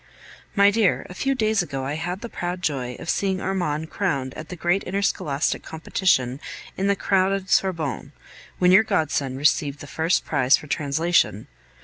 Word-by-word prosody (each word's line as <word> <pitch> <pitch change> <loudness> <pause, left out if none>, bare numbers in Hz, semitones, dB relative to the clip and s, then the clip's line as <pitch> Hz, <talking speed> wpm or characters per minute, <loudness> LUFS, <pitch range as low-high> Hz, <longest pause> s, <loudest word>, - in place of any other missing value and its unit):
My 200 -1 +6
dear, 215 -2 +2
a - - -7
few 270 +8 -1
days 220 -4 +2
ago 135 -6 -4
I 140 - -2
had 175 +4 -4
the 235 - -5
proud 180 -4 -5
joy 125 -5 -2
of - - -10
seeing 190 +2 0
Armand 160 -5 -2
crowned 135 -10 -1
at 155 - -9
the 180 - -6
great 175 +3 +1
interscholastic 180 -7 -1
competition 150 -5 0 0.4
in 195 - -1
the 200 - +3
crowded 190 0 0
Sorbonne, 160 -7 0 0.5
when 180 0 +4
your 190 +3 +8
godson 145 -9 -1
received 145 0 +1
the - - -9
first 160 +4 0
prize 130 +1 +3
for - - -11
translation. 150 - +1
175 Hz, 165 wpm, -23 LUFS, 145-190 Hz, 0.5 s, your